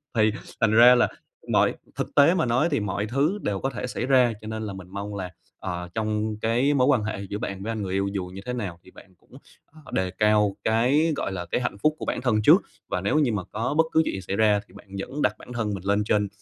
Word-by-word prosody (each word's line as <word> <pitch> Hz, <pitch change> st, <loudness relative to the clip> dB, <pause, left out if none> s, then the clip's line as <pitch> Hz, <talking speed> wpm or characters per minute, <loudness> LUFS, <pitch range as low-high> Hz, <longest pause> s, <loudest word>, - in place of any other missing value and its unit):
thì 110 Hz, -1 st, +4 dB, 0.3 s
thành 110 Hz, -2 st, +4 dB
ra 120 Hz, +3 st, +8 dB
là 120 Hz, -, +4 dB, 0.4 s
mọi -, -, +3 dB, 0.2 s
thực -, -, -4 dB
tế 145 Hz, +5 st, +6 dB
mà 165 Hz, -4 st, +1 dB
nói 125 Hz, +6 st, +2 dB
thì 140 Hz, -, +1 dB
mọi 105 Hz, 0 st, -2 dB
thứ 140 Hz, -, 0 dB
đều 100 Hz, -2 st, -1 dB
có 135 Hz, -, -1 dB
thể 125 Hz, -1 st, -5 dB
xảy 125 Hz, -, -3 dB
ra. 125 Hz, -3 st, +4 dB
Cho 110 Hz, -, -9 dB
nên 110 Hz, 0 st, -4 dB
là 105 Hz, -2 st, -5 dB
mình 95 Hz, -2 st, -9 dB
mong 100 Hz, +1 st, -5 dB
là, 95 Hz, -2 st, -4 dB, 0.3 s
ờ, 90 Hz, 0 st, -5 dB
trong 110 Hz, 0 st, -1 dB
cái 120 Hz, +6 st, +2 dB
mối 130 Hz, -1 st, +3 dB
quan 130 Hz, -6 st, +3 dB
hệ 110 Hz, -1 st, -3 dB
giữa 105 Hz, -, -3 dB
bạn 100 Hz, -2 st, -5 dB
với 115 Hz, -, -3 dB
anh 110 Hz, -, -3 dB
người 95 Hz, -2 st, -3 dB
yêu 100 Hz, 0 st, 0 dB
dù 95 Hz, -2 st, -2 dB
như 95 Hz, -, -8 dB
thế 125 Hz, -, -3 dB
nào 100 Hz, -8 st, -5 dB
thì 95 Hz, -, -17 dB
bạn 95 Hz, -1 st, -17 dB
cũng, -, -, -32 dB, 0.3 s
ờ, 155 Hz, 0 st, -19 dB
đề 95 Hz, -1 st, -1 dB
cao 105 Hz, -2 st, +2 dB
cái, 130 Hz, +9 st, +2 dB
gọi 100 Hz, -, -3 dB
là, 90 Hz, -2 st, -4 dB
cái 125 Hz, -, +1 dB
hạnh 120 Hz, -, -3 dB
phúc 155 Hz, 0 st, +3 dB
của -, -, -5 dB
bản -, -, -2 dB
thân 115 Hz, -4 st, +1 dB
trước. -, -, +7 dB, 0.3 s
Và 90 Hz, -, -1 dB
nếu 100 Hz, +11 st, +1 dB
như 140 Hz, -6 st, +2 dB
mà 100 Hz, -, -2 dB
có 115 Hz, +6 st, -2 dB
bất 160 Hz, -, +5 dB
cứ 160 Hz, -, +4 dB
chuyện -, -, -2 dB
gì 95 Hz, -, -5 dB
xảy 95 Hz, +2 st, -4 dB
ra 105 Hz, -1 st, +3 dB
thì -, -, -21 dB
bạn -, -, -14 dB
vẫn 145 Hz, +9 st, -5 dB
đặt -, -, +2 dB
bản 125 Hz, -, -11 dB
thân 110 Hz, -3 st, -2 dB
mình 95 Hz, -2 st, -6 dB
lên 100 Hz, +1 st, +2 dB
trên 105 Hz, -1 st, +1 dB
110 Hz, 275 wpm, -25 LUFS, 100-125 Hz, 0.4 s, ra